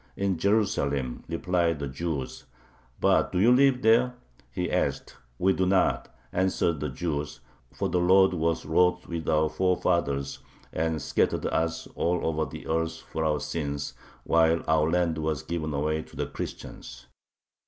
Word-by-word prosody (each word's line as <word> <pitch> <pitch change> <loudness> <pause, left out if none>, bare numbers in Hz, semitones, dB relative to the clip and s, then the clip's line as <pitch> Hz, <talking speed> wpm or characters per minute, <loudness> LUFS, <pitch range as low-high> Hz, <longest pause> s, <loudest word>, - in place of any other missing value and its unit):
"In 95 -3 0
Jerusalem," 70 - 0
replied 85 -1 0
the 70 -1 -4
Jews. 70 0 -4 0.5
"But - - +3
do - - -2
you 115 +6 +5
live 130 -1 +4
there?" 120 +3 +4 0.3
he - - -3
asked. - - -1 0.2
"We 95 +1 +3
do 95 0 0
not," 95 0 +1 0.2
answered 90 -3 +1
the 75 +1 -2
Jews, 75 0 -3 0.3
"for - - -2
the 90 - 0
Lord 95 +2 +5
was 85 -2 -1
wroth 90 +3 +2
with 85 -2 -4
our 80 0 +3
forefathers, 80 -4 0 0.3
and 80 0 -1
scattered - - 0
us 80 0 -1
all 85 +1 0
over 80 -1 0
the - - -9
earth 80 0 -1
for 80 - -2
our 75 -1 +1
sins, 70 -2 -3 0.3
while 80 0 +3
our 80 0 +3
land 85 -2 +1
was 80 -1 -2
given 80 -1 -3
away 75 +2 -1
to - - -15
the - - -2
Christians." - - -8
80 Hz, 155 wpm, -27 LUFS, 75-90 Hz, 0.5 s, you